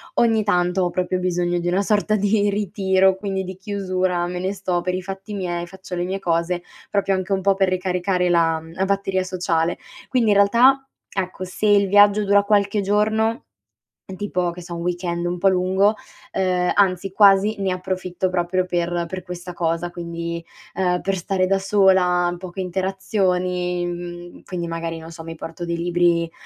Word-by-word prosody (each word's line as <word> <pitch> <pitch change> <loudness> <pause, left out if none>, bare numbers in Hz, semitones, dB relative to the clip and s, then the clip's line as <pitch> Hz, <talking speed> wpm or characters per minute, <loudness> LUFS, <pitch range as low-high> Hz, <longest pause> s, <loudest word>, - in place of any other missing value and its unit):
ogni 225 -2 +3
tanto 180 -2 +1
ho 175 - +1
proprio 180 +1 -1
bisogno 175 -1 0
di 175 - -3
una 190 +3 +1
sorta 215 +1 +1
di 205 0 +2
ritiro, 190 -1 +2
quindi 190 -1 -3
di 185 0 -7
chiusura, 185 -2 -1
me 180 0 -4
ne 190 +2 -1
sto 185 -3 -1
per 180 0 -2
i 185 - -3
fatti 195 +2 -7
miei, 175 -2 -3
faccio 190 0 -11
le 175 0 -1
mie 190 +1 -2
cose, 175 -1 -1 0.3
proprio 195 -1 +1
anche 190 +1 -1
un 190 - 0
po' 195 +1 +3
per 195 -1 +1
ricaricare 180 0 0
la, 165 -2 +3
mhmm, 165 +1 -13
la 190 +2 -1
batteria 195 -1 0
sociale. 175 -2 -1 0.3
Quindi 235 -5 +2
in 200 - +4
realtà, 255 +7 +5 0.2
ecco, 185 -1 -4
se 185 +4 -2
il 200 -1 +5
viaggio 205 +1 +5
dura 200 0 +5
qualche 205 0 +2
giorno, 215 +3 +1 0.7
tipo 180 -3 -1
che 175 +1 -9
so 170 0 -8
un 170 - -5
weekend 175 0 -2
un 175 +1 -2
po' 195 +2 +4
lungo, 190 +3 +2 0.4
ehm, 180 -1 +1
anzi 195 -1 +2
quasi 200 +1 +5
ne 190 -1 +1
approfitto 185 0 -2
proprio 180 0 0
per 175 -1 -1
per 185 0 -5
questa 180 0 -8
cosa, 170 0 -1
quindi, 170 -1 -5 0.3
ehm, 180 -1 +1
per 195 0 -1
stare 185 +1 0
da 195 +1 +2
sola, 185 -3 +3
poche 185 +1 -7
interazioni. 180 -1 -1
Mhmm, 175 0 -7
quindi 175 -2 -4
magari 165 0 -4
non 160 +1 -10
so 165 0 -9
mi 165 0 -7
porto 165 +2 -7
dei 170 0 -2
libri, 170 -1 +1
185 Hz, 180 wpm, -22 LUFS, 175-195 Hz, 0.7 s, realtà